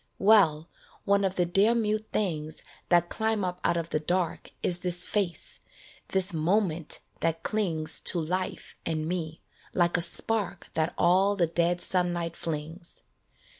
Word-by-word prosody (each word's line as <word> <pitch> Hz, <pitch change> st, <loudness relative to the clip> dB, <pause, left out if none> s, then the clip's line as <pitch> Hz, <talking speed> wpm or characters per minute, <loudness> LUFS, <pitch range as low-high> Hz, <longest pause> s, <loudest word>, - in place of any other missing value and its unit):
Well, 190 Hz, -7 st, +4 dB, 0.4 s
one 200 Hz, 0 st, +3 dB
of 190 Hz, -1 st, 0 dB
the 175 Hz, -, +2 dB
dear 200 Hz, +7 st, +3 dB
mute 215 Hz, -1 st, 0 dB
things 160 Hz, -6 st, -2 dB, 0.3 s
That 175 Hz, -1 st, +4 dB
climb 220 Hz, -3 st, 0 dB
up 180 Hz, 0 st, -4 dB
out 170 Hz, -, +2 dB
of 165 Hz, 0 st, -3 dB
the 155 Hz, -, +1 dB
dark 175 Hz, +2 st, -1 dB
Is 175 Hz, -1 st, +2 dB
this 180 Hz, 0 st, -1 dB
face, 195 Hz, -5 st, -2 dB, 0.5 s
this 190 Hz, -1 st, 0 dB
moment 165 Hz, 0 st, +1 dB, 0.2 s
that 165 Hz, 0 st, -1 dB
clings 165 Hz, -7 st, 0 dB
To 175 Hz, -, +3 dB
life 185 Hz, +4 st, -3 dB
and 155 Hz, -1 st, -2 dB
me, 160 Hz, -2 st, -4 dB, 0.3 s
like 175 Hz, -1 st, +3 dB
a -, -, 0 dB
spark 205 Hz, +3 st, +1 dB
That 160 Hz, +1 st, -1 dB
all 190 Hz, +4 st, +4 dB
the 180 Hz, -4 st, +3 dB
dead 170 Hz, +1 st, 0 dB
sunlight 175 Hz, -2 st, -1 dB
flings. 165 Hz, +2 st, -6 dB
175 Hz, 150 wpm, -28 LUFS, 165-195 Hz, 0.5 s, Well